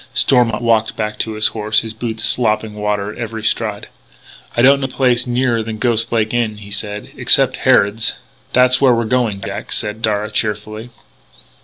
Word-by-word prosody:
Stormont 120 -3 +2
walked 115 -1 +1
back 105 0 -4
to 110 - -2
his 110 0 +3
horse, 110 0 0
his 110 -1 -6
boots 115 0 -5
slopping 110 -2 +1
water 105 -1 -2
at - - -12
every 115 -2 -5
stride. 110 -2 -1 0.7
"I 120 - +3
don't 140 +2 +6
know 135 - -2
any 130 - -14
place 125 -2 +2
nearer 120 -1 0
than 110 0 -5
Ghost 115 0 +1
Lake 110 -1 0
Inn," 115 -3 -1
he 100 -1 -12
said... 105 0 -6
"except - - +2
Harrod's." 105 +2 +2 0.4
"That's 125 +1 +4
where 130 -3 +5
we're 115 0 -1
going, 110 -4 0
Jack," - - -6
said 105 +1 -2
Darragh 105 -1 -1
cheerfully. 110 +2 -3
110 Hz, 180 wpm, -17 LUFS, 105-120 Hz, 0.7 s, don't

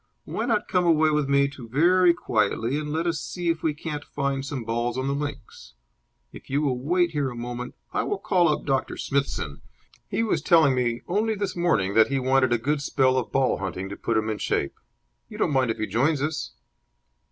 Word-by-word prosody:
Why 225 - -3
not 220 -4 +1
come 180 -1 +1
away 160 -2 +4
with 150 -2 0
me 140 0 +4
very 170 +10 +4
quietly 120 -3 0
and 150 -1 -5
let 160 +2 -1
us 165 -3 0
see 175 +1 -3
if 165 -1 0
we 155 -2 0
can't 150 -1 -5
find 140 -1 -2
some 135 -3 -4
balls 120 +2 -2
on 130 - -1
the 140 - 0
links? 135 - -6 0.6
If - - -13
you 140 +3 0
will 130 -4 0
wait 175 +5 +1
here 145 -4 -1
a 120 - -8
moment, 120 +1 -6 0.2
I - - +1
will 410 - -2
call 180 - +2
up 150 - -1
Doctor 135 -2 -1
Smithson. 135 - -2 0.5
He 225 - 0
was 225 - 0
telling 160 -7 +5
me 120 -2 -1
only 215 +4 0
this 200 -2 -3
morning 160 - +1
that 110 +1 +5
he 140 - -1
wanted 130 -1 +2
a 120 - +4
good 145 +5 -1
spell 130 -2 +2
of 120 -6 -1
ball 135 -1 +1
hunting 95 0 -4
to 100 - -6
put 115 +2 -1
him 110 0 0
in 110 -1 -2
shape. 70 - -1 0.6
You - - -9
don't - - +1
mind 130 -2 +2
if 110 - -1
he 110 - -1
joins 135 +8 +1
us?" 155 -5 -3
140 Hz, 215 wpm, -25 LUFS, 120-160 Hz, 0.6 s, telling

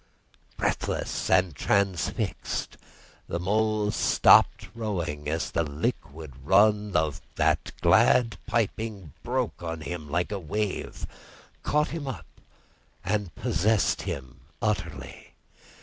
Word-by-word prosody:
Breathless - - -1
and 90 -3 +3
transfixed 95 +3 -1 0.5
the 85 - -3
Mole 105 +2 +1
stopped - - +5
rowing 85 -10 -3
as 80 +1 -2
the 85 - +1
liquid 75 - -4
run 105 +3 +3
of 80 -2 +1
that - - +1
glad 115 -2 +4
piping 110 - -2
broke 125 -4 -2
on 80 -2 -4
him 80 0 -6
like 85 +5 -1
a 100 - -2
wave, 100 +4 -3 0.6
caught 150 +1 +1
him 160 -4 -5
up, 115 - -5 0.8
and 100 -5 -1
possessed 105 +2 +1
him 65 -1 -6 0.2
utterly. 90 -10 -4
95 Hz, 105 wpm, -27 LUFS, 80-110 Hz, 0.8 s, stopped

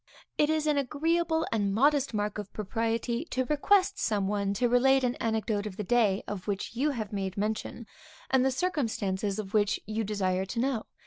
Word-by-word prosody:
It 295 - +2
is 315 -1 +1
an 300 -2 +2
agreeable 320 +4 0
and 205 -3 +1
modest 280 +3 +3
mark 210 -1 -2
of 205 -2 -7
propriety 230 +4 -1
to 260 -5 -1
request 370 +8 +2
some 205 -3 0
one 200 -1 0
to 245 +3 +2
relate 265 +2 +4
an 245 -1 +1
anecdote 220 -2 -1
of 195 -2 -8
the 210 - -2
day, 210 -2 +2
of 205 -2 -6
which 205 +3 -3
you 280 +5 +1
have 220 -7 -4
made 195 -1 -3
mention, 215 +3 -3 0.5
and 260 -1 +4
the 265 - +3
circumstances 220 - -1
of 210 -1 -5
which 205 -2 +2
you 220 +2 -2
desire 190 -3 -1
to 230 - -3
know. 250 -3 0
225 Hz, 190 wpm, -29 LUFS, 205-270 Hz, 0.5 s, relate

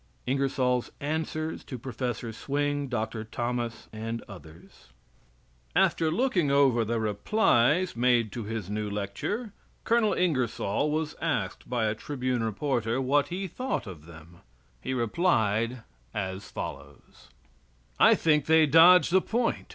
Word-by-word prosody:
INGERSOLL'S 130 -2 0
ANSWER 155 +1 -3
TO 130 - -8
PROF. 120 -2 -4
SWING, 145 +2 -1
DR. 110 -2 -3
THOMAS, 120 +1 -4
AND 115 +1 -5
OTHERS 85 -6 -14 0.9
After 160 -1 +3
looking 180 - +1
over 135 -4 +4
the 115 +1 -1
replies 120 - +2
made 120 -2 +2
to 120 - -5
his 110 -3 -5
new 105 +1 -3
lecture, 105 - -4 0.3
Col. 230 -2 +2
Ingersoll 140 - 0
was 155 0 -2
asked 125 - -2
by 120 -3 0
a 105 - +1
Tribune 125 0 -3
reporter 115 +1 -1
what 140 +2 +2
he 190 +2 -4
thought 255 - -3
of 85 -6 -10
them. 85 +1 -14 0.4
He 130 - -3
replied 115 - +1 0.3
as 95 -1 -4
follows: - - -9 0.7
I - - +7
think 150 -3 +2
they 160 0 +6
dodge 165 +3 +7
the 190 +1 +5
point. 235 +4 -1
125 Hz, 130 wpm, -28 LUFS, 110-155 Hz, 0.9 s, I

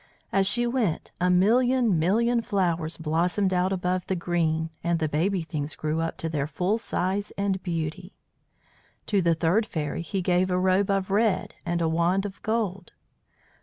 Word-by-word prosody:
As 195 -1 +2
she 240 +4 +3
went 235 -9 -1
a 180 - +3
million 230 +2 +3
million 230 +8 +2
flowers 175 -7 -1
blossomed 175 +5 0
out 180 +1 +1
above 180 -1 -1
the 190 - 0
green, 165 -2 -1
and 170 0 +1
the 160 -1 0
baby 170 +5 0
things 155 -2 -4
grew 155 +1 -2
up 165 - -3
to 165 - -3
their 150 -3 -2
full 180 +8 -1
size 200 0 -1
and 200 -1 0
beauty. 170 +1 -4 0.9
To 200 -3 +1
the 170 -1 +2
third 180 +7 +1
fairy 150 -3 -3
he 190 +2 -3
gave 180 +1 +2
a 180 - +1
robe 185 +2 +2
of 195 -1 0
red 210 0 +1
and 170 0 0
a - - +2
wand 170 +4 +1
of 200 -1 -7
gold. 200 -5 -2
180 Hz, 170 wpm, -26 LUFS, 165-200 Hz, 0.9 s, she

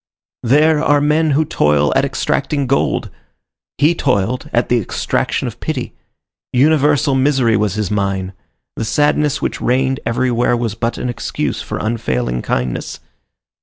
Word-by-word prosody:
There 150 +5 +3
are 145 -2 +3
men 155 +2 +2
who 155 - +2
toil 75 - +2
at - - +3
extracting 140 -2 -1
gold; 135 +2 0 0.7
he 155 +4 +4
toiled 125 - -1
at 120 0 +1
the 120 - +2
extraction 105 - -2
of - - -7
pity. - - -4 0.6
Universal 145 +1 +3
misery 130 -4 +2
was 105 -2 0
his 105 -3 -2
mine. 100 -2 -1 0.4
The - - -3
sadness 145 +4 +1
which - - -2
reigned 130 +2 +1
everywhere 120 +1 +1
was 115 -3 -2
but 115 +2 -2
an - - -3
excuse 120 -1 -3
for - - -5
unfailing 60 - -2
kindness. 60 0 -3
125 Hz, 140 wpm, -17 LUFS, 105-145 Hz, 0.7 s, he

